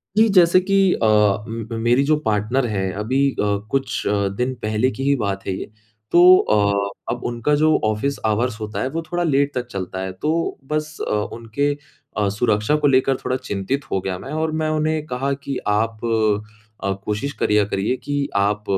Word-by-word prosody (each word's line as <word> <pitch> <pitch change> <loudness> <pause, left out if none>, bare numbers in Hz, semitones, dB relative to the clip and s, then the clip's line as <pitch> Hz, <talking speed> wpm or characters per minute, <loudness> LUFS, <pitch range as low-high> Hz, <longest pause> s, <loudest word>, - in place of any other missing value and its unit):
जी 220 +1 +5
जैसे 175 +1 +6
की 195 0 +4
अ, 115 - -1 0.4
म 115 0 -5
मेरी 120 +4 +3
जो 155 +2 +3
पार्टनर 110 +5 +1
है 95 -3 -1
अभी 130 +6 +1
अ, - - -15 0.3
कुछ 135 -2 -1
अ, 100 -1 +1
दिन 125 +1 0
पहले 110 +4 +1
की 135 - -5
ही 140 +1 +3
बात 100 -5 -3
है 95 - 0
ये। - - -7 0.4
तो 175 - +6 0.2
अ, 100 -1 +1 0.2
अब 120 - -8
उनका 120 +5 0
जो 155 +1 +3
ऑफिस 110 +6 0
आवर्स 110 +1 0
होता 110 0 -4
है 130 - 0
वो 165 +4 -3
थोड़ा 175 0 0
लेट 140 -2 +1
तक 125 -1 -2
चलता 95 -1 -5
है। 95 0 -3
तो 165 +2 0
बस 155 0 -2
अ, - - -2
उनके 115 +6 -1 0.5
अ, 105 -2 +2
सुरक्षा 105 +4 +1
को 150 -1 +2
लेकर 135 0 +3
थोड़ा 130 - 0
चिंतित 130 +2 -3
हो 95 - 0
गया 95 -1 -3
मैं। 135 - -8
और 160 0 -1
मैं 155 - 0
उन्हें 155 0 0
कहा 135 0 -2
कि 135 -2 -3
"आप 110 +1 0 0.8
अ, 100 - 0
कोशिश 105 +7 -2
करिया, 105 -5 +2
करिए 100 +4 -1
कि 145 -1 -1
आप 100 +1 +1
125 Hz, 190 wpm, -21 LUFS, 105-140 Hz, 0.8 s, जैसे